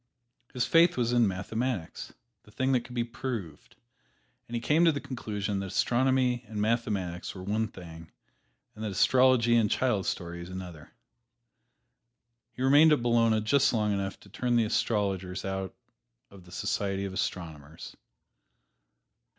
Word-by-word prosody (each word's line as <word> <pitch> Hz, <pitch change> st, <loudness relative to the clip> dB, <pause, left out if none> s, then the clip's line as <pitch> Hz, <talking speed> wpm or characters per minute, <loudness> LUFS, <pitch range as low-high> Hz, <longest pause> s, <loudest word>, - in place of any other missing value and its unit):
His 125 Hz, -1 st, -1 dB
faith 170 Hz, 0 st, +4 dB
was 120 Hz, -1 st, +1 dB
in 120 Hz, -2 st, +4 dB
mathematics 100 Hz, +1 st, -3 dB, 0.3 s
the -, -, -21 dB
thing 130 Hz, +5 st, -1 dB
that 130 Hz, -, +3 dB
could 125 Hz, +1 st, -12 dB
be 120 Hz, -, +1 dB
proved 115 Hz, -, -6 dB, 0.7 s
and 120 Hz, -, -6 dB
he -, -, 0 dB
came 150 Hz, +8 st, +2 dB
to 165 Hz, -, +6 dB
the 145 Hz, -, -3 dB
conclusion 105 Hz, -7 st, -4 dB
that 100 Hz, -, -4 dB
astronomy 125 Hz, +4 st, +1 dB
and 105 Hz, -1 st, -6 dB
mathematics 105 Hz, -6 st, -2 dB
were 95 Hz, -, -8 dB
one 110 Hz, +3 st, -1 dB
thing, 85 Hz, -5 st, -12 dB, 0.6 s
and 110 Hz, -, -9 dB
astrology 120 Hz, +3 st, +3 dB
and 110 Hz, -3 st, +3 dB
child 110 Hz, -7 st, 0 dB
stories 85 Hz, 0 st, -4 dB
another. 90 Hz, -5 st, -8 dB, 1.6 s
He 130 Hz, -, -5 dB
remained 145 Hz, +4 st, +6 dB
at 145 Hz, -6 st, +2 dB
Bologna 115 Hz, -2 st, +3 dB
just 135 Hz, +6 st, +3 dB
long 105 Hz, -2 st, +1 dB
enough 100 Hz, -1 st, -3 dB
to 100 Hz, -, -17 dB
turn 120 Hz, +4 st, -1 dB
the 115 Hz, -2 st, +3 dB
astrologers 100 Hz, -4 st, -1 dB
out 95 Hz, 0 st, -4 dB, 0.6 s
of 95 Hz, -3 st, -15 dB
the 90 Hz, -, -16 dB
society 100 Hz, -1 st, -2 dB
of 95 Hz, -, -5 dB
astronomers. 80 Hz, -4 st, -5 dB
110 Hz, 145 wpm, -28 LUFS, 95-125 Hz, 1.6 s, to